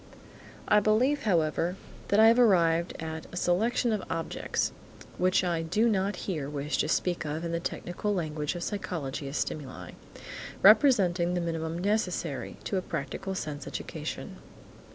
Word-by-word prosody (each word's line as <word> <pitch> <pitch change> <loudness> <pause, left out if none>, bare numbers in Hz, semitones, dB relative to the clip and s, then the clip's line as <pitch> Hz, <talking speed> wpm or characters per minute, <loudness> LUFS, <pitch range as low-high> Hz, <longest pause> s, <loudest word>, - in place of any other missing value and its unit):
I 210 - +6
believe, 230 +7 +2
however, 170 -2 +1 0.3
that 200 - +3
I 220 - +8
have 230 +2 +4
arrived 170 -7 +4
at 160 0 -5
a 180 - -7
selection 220 +7 +1
of 210 - -1
objects 165 0 -2 0.5
(which 185 +1 +3
I 170 -2 0
do 185 +8 +1
not 200 -2 +1
here 155 -8 -3
wish 145 0 -2
to - - +2
speak 175 +2 0
of 155 +2 -3
in 170 - -3
the 170 - -1
technical 175 +4 -3
language 155 -4 -2
of 175 - -4
psychology 155 -9 -4
as 135 - -4
stimuli) 140 -4 -4 0.7
representing 190 -6 +5
the 175 - 0
minimum 165 -1 -3
necessary 180 -6 -1
to 195 - -1
a - - 0
practical 185 +5 -4
sense 145 -5 -5
education. - - -6
175 Hz, 155 wpm, -29 LUFS, 160-205 Hz, 0.7 s, I